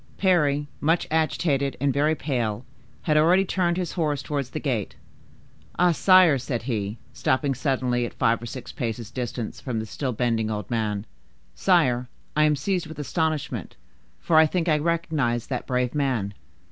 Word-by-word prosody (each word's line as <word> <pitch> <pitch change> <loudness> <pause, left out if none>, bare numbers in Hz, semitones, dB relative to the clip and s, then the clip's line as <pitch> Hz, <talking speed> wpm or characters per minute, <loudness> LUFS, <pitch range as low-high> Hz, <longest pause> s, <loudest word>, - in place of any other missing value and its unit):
Parry, 150 -7 +2
much 165 +3 +2
agitated 150 -3 +1
and 140 0 +1
very 150 +3 +2
pale, 120 -7 -2 0.4
had 150 -2 +2
already 175 +5 +5
turned 180 -2 0
his 180 -3 -2
horse 150 -6 -1
towards 140 -4 -3
the 155 - -4
gate. 120 -10 -2 0.8
"Ah, 180 0 +4
sire!" 180 -3 +5
said 120 -1 -3
he, 110 -3 -2 0.2
stopping 135 +1 +1
suddenly 130 -2 0
at 120 - -5
five 115 0 +2
or 120 - -6
six 125 0 -7
paces' 115 -2 -4
distance 120 -2 -4
from 125 -4 -3
the 110 - -2
still 130 +4 -3
bending 115 -2 0
old 105 -2 -4
man: 105 -3 -1 0.5
"sire, 125 - +2 0.3
I 155 0 +4
am 150 -1 +3
seized 175 +4 -1
with 160 -1 -9
astonishment, 155 0 -2 0.4
for 160 - +2
I 160 0 +7
think 175 +1 -1
I 155 -2 +3
recognize 155 -7 0
that 130 -3 -4
brave 125 -1 0
man. 125 -9 0
140 Hz, 165 wpm, -25 LUFS, 120-160 Hz, 0.8 s, I